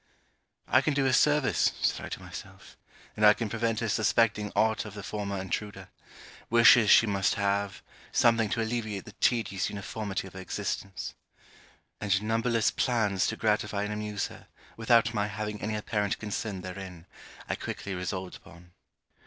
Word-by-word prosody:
'I 130 - +4
can 155 - 0
do 135 -1 +2
her 130 - +2
service,' 150 +1 +3
said - - 0
I - - -6
to - - -5
myself; 95 0 -11 0.4
'and 105 - -2
I 105 0 +8
can 115 -3 -3
prevent 115 -1 -1
her 115 - -1
suspecting 105 0 +2
aught 110 0 +2
of 105 -1 -9
the 105 - -7
former 100 -2 -4
intruder. 95 0 -5 0.6
Wishes 115 -1 +7
she - - +7
must 100 -3 +1
have; 100 -1 -1 0.3
something 115 -3 +3
to 115 +1 0
alleviate 110 -3 -3
the - - -10
tedious 105 -3 0
uniformity 100 0 -4
of 95 - -11
her 95 - -8
existence.' 95 +1 -4 0.9
And 100 -2 +1
numberless 115 +1 +1
plans 105 -7 +1
to 110 - -2
gratify 105 -2 0
and 105 0 -3
amuse 105 -1 -3
her, - - -14 0.3
without 115 0 +3
my 105 -2 0
having 105 0 -5
any 110 +2 -2
apparent 105 -1 -1
concern 105 -2 -4
therein, 90 -2 -8 0.4
I - - -1
quickly 100 - -5
resolved 90 0 -4
upon. 85 +1 -17
105 Hz, 160 wpm, -28 LUFS, 100-115 Hz, 0.9 s, I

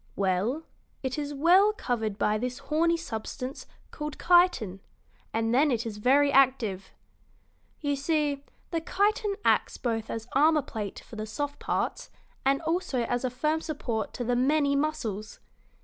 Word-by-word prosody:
"Well, 200 - 0 0.4
it 260 +2 -2
is 290 0 -3
well 355 +9 +5
covered 225 - -2
by 210 0 +1
this 250 +1 -3
horny 335 +2 +1
substance 255 -1 -6 0.2
called 300 -1 -5
chitin, 345 - +3 0.5
and 225 +1 0
then 290 +5 +4
it 235 -2 0
is 215 -2 -5
very 280 +5 +4
active. 250 -9 +2 0.9
You 290 -2 0
see, 290 -1 0 0.3
the 330 -2 -1
chitin 410 +4 +1
acts - - +2
both 225 -3 -2
as 225 0 -5
armor 300 +2 +4
plate 215 -7 -5
for 225 - -10
the 215 0 -4
soft 290 +5 -4
parts - - -2 0.3
and 275 +4 +2
also 320 -6 0
as 245 +2 -1
a 255 - +1
firm 305 +6 0
support 235 -10 -3
to 245 - -3
the 245 +1 +1
many 280 +3 +2
muscles. 265 -9 -2
275 Hz, 150 wpm, -28 LUFS, 225-310 Hz, 0.9 s, well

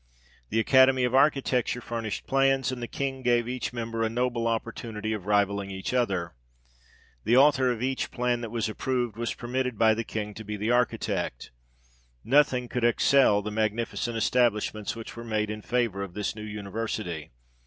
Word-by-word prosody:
The 110 - +1
Academy 130 +2 +5
of 125 0 0
Architecture 135 -3 +2
furnished 115 -3 -4
plans, 135 0 +2
and 125 -1 -5
the 120 - -3
King 135 0 -3
gave 120 -2 +2
each 125 -1 -3
member 115 -1 -4
a 110 - +1
noble 120 0 -1
opportunity 110 -1 -3
of 100 -3 -6
rivalling 100 -1 +1
each 95 +4 -4
other. 95 -9 0 0.9
The 120 - +3
author 135 -2 +5
of 120 0 -3
each 130 0 -1
plan 125 -1 -1
that 115 - -5
was 115 0 -1
approved, 120 0 -2
was 115 +1 -3
permitted 125 0 -2
by 110 0 +5
the 115 +1 -2
King 105 -2 -4
to 110 - -8
be 105 0 -5
the 105 +3 -1
architect. 120 - -1 0.7
Nothing 130 -1 +3
could 125 0 -3
excel 120 -3 +4
the 105 - -4
magnificent 110 +2 -1
establishments 110 -3 +1
which 115 -1 -8
were 115 - -7
made 110 -2 -1
in 105 0 -6
favour 115 -4 -1
of 100 -3 -6
this 105 0 -2
new 110 - -8
university. 105 -5 -4
115 Hz, 175 wpm, -27 LUFS, 105-125 Hz, 0.9 s, Academy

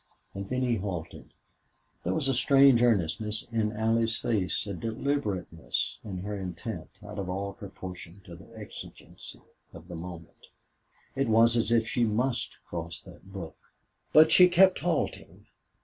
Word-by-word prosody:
And 100 0 -6
then 130 0 0
he 120 -2 +1
halted. 90 -5 -6 0.7
There - - -1
was 155 -4 0
a 135 - +2
strange 135 -2 +5
earnestness 105 -1 +1
in 110 -2 0
Allie's 115 +1 +1
face 105 -5 -1
a 100 - -4
deliberateness 110 - -2
in 95 -3 -6
her 105 +1 -4
intent, 90 0 -6 0.2
out 105 0 -7
of 95 -2 -4
all 100 +2 -3
proportion 95 -4 -9
to 85 -3 -10
the 95 +6 -15
exigency 105 -1 -11 0.3
of 85 0 -12
the 90 - -7
moment. 85 0 -10 0.7
It 135 -3 0
was 115 +1 +5
as 115 -1 +1
if 115 -1 +3
she 120 +1 +1
must 120 +2 0
cross 85 -1 -6
that 95 - -15
brook. 95 -5 -7 0.6
But 155 +1 +7
she 180 0 +8
kept 185 +2 +5
halting. 170 -4 -2
105 Hz, 150 wpm, -28 LUFS, 95-120 Hz, 0.7 s, she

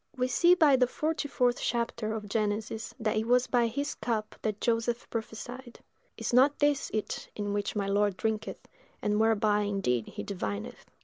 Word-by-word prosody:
We 255 0 +1
see 345 +7 +5
by 305 -6 +5
the 250 -1 +4
forty 310 +3 -2
fourth 250 -3 +1
chapter 235 -2 -1
of 210 -1 -5
Genesis 215 +1 -2
that 220 -1 0
it 220 +1 0
was 250 +1 +4
by 240 -2 +2
his 285 +6 -2
cup 220 -1 -2
that 215 -2 -2
Joseph 235 0 0
prophesied: 240 +2 -6 0.4
"Is - - -3
not 270 +4 +5
this 290 -1 +2
it 215 -1 -3
in 205 -1 -2
which 205 +1 -2
my 200 -1 0
lord 200 -1 +1
drinketh, 220 -1 -3 0.4
and 210 0 +1
whereby 215 -1 +3
indeed 195 - 0
he - - -6
divineth?" 105 - -5
225 Hz, 175 wpm, -29 LUFS, 210-250 Hz, 0.4 s, see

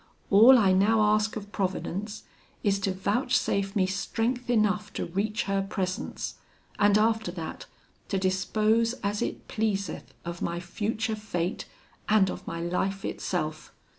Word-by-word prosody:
All 230 +6 +9
I 195 -5 +4
now 210 +4 +4
ask 215 0 +1
of 205 -2 -7
Providence 200 +2 -3 0.4
is, 200 -1 +2
to 195 -1 0
vouchsafe 200 0 0
me 190 -3 +3
strength 225 +6 -2
enough 210 -2 +2
to - - -2
reach 205 +5 -1
her 195 0 0
presence, 190 -2 -3 0.4
and 205 0 +5
after 220 -3 +2
that, 165 -3 -6 0.4
to 195 - -1
dispose 215 +5 +2
as 205 +1 -1
it - - -3
pleaseth 200 -5 -2
of 170 0 -5
my 170 0 -2
future 215 +5 -2
fate, 190 -4 -3 0.4
and 210 -3 +4
of - - -9
my 165 - -4
life 190 +3 -1
itself. 155 -3 -3
200 Hz, 140 wpm, -27 LUFS, 185-215 Hz, 0.4 s, All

